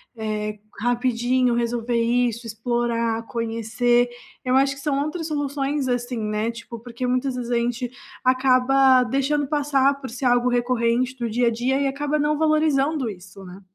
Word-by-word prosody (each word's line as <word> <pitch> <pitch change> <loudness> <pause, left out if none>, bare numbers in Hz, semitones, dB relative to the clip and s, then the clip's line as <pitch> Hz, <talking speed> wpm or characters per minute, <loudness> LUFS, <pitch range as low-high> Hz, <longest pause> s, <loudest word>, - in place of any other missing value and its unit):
Eh, 215 -1 -3 0.2
rapidinho 245 +1 +1
resolver 235 0 -1
isso, 235 0 +1
explorar, 230 0 -1
conhecer, 230 +1 0 0.3
eu 255 0 +1
acho 275 +1 +3
que 280 - -11
são 280 -1 0
outras 320 +1 -4
soluções 285 -2 -2
assim, 245 0 -2
né, 215 +1 -1
tipo 230 0 -9
porque 240 +2 -6
muitas 255 +1 0
vezes 245 -1 -4
a 240 - +2
gente 240 +1 -2 0.3
acaba 255 0 +4
deixando 275 +3 0
passar 280 -2 +2
por 265 - -6
ser 250 +3 -5
algo 245 0 +3
recorrente 245 +1 +1
do 235 -2 -2
dia 240 +2 +1
a - - +3
dia 250 +4 0
e 275 - +2
acaba 290 +2 -1
não 295 0 +1
valorizando 305 -3 +2
isso, 195 0 -11
né. 185 +2 -11
245 Hz, 160 wpm, -23 LUFS, 235-270 Hz, 0.3 s, acaba